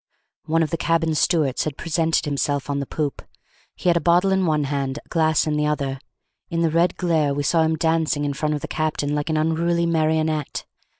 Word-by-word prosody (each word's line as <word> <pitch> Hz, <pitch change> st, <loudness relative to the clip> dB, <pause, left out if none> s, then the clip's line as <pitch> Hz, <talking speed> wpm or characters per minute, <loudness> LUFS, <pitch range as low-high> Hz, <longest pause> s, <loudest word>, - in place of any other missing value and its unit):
One 165 Hz, +1 st, +2 dB
of 155 Hz, -, -3 dB
the 165 Hz, -, -1 dB
cabin 165 Hz, -1 st, +1 dB
stewards 155 Hz, -4 st, +1 dB
had 150 Hz, -3 st, -4 dB
presented 165 Hz, 0 st, 0 dB
himself 145 Hz, -1 st, -1 dB
on 140 Hz, -, -1 dB
the 140 Hz, -, -4 dB
poop; 150 Hz, -3 st, -3 dB, 0.5 s
he -, -, -5 dB
had 175 Hz, -, +5 dB
a -, -, 0 dB
bottle 175 Hz, +3 st, +3 dB
in 190 Hz, -2 st, +2 dB
one 155 Hz, -2 st, +1 dB
hand, 140 Hz, -1 st, -2 dB
a -, -, -11 dB
glass 160 Hz, -2 st, +2 dB
in 150 Hz, -1 st, 0 dB
the 150 Hz, 0 st, +1 dB
other; 140 Hz, -3 st, -2 dB, 0.5 s
in 165 Hz, -1 st, -1 dB
the 165 Hz, -2 st, +2 dB
red 170 Hz, +2 st, +2 dB
glare 160 Hz, -5 st, +1 dB
we 145 Hz, -, -1 dB
saw 165 Hz, +3 st, +2 dB
him 160 Hz, 0 st, +2 dB
dancing 160 Hz, -2 st, 0 dB
in 145 Hz, -, -1 dB
front 150 Hz, +2 st, -1 dB
of 145 Hz, -, -5 dB
the -, -, -5 dB
captain 155 Hz, -2 st, -1 dB
like 150 Hz, +1 st, -2 dB
an 155 Hz, -, +1 dB
unruly 170 Hz, +2 st, +1 dB
marionette. 155 Hz, -2 st, 0 dB
155 Hz, 220 wpm, -22 LUFS, 145-165 Hz, 0.5 s, had